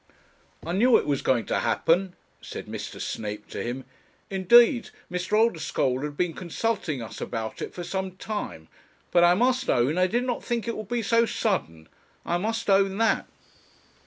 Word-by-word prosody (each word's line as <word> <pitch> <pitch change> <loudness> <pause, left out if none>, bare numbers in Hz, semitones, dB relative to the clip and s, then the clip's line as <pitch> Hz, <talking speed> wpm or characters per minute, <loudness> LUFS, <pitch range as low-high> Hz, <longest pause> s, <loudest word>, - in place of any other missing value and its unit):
'I 165 - -3
knew 230 +7 +5
it - - -2
was 140 -2 0
going 125 -3 +1
to - - 0
happen,' 180 +2 +1 0.3
said - - -7
Mr. - - -7
Snape 105 -1 -4
to - - -5
him. 125 +2 -4 0.5
'Indeed, 235 +6 +5 0.2
Mr. 180 +3 -3
Oldeschole 160 - +1
has 150 0 -3
been 170 +3 -1
consulting 175 - -2
us 110 - -9
about 110 -2 -4
it - - -4
for 175 - -7
some 190 +1 -3
time; 205 - -5 0.4
but 175 - +5
I 175 +1 +6
must 250 +5 +1
own 135 +8 +2
I 185 - +4
did 240 +6 0
not 250 -2 -2
think 235 -2 -2
it 230 - -2
would 215 -2 -6
be 240 -1 -1
so 230 +2 +3
sudden; 85 - -2 0.4
I 175 +1 0
must 225 +4 -2
own 195 -1 +3
that.' 225 0 +2
185 Hz, 175 wpm, -26 LUFS, 145-225 Hz, 0.5 s, I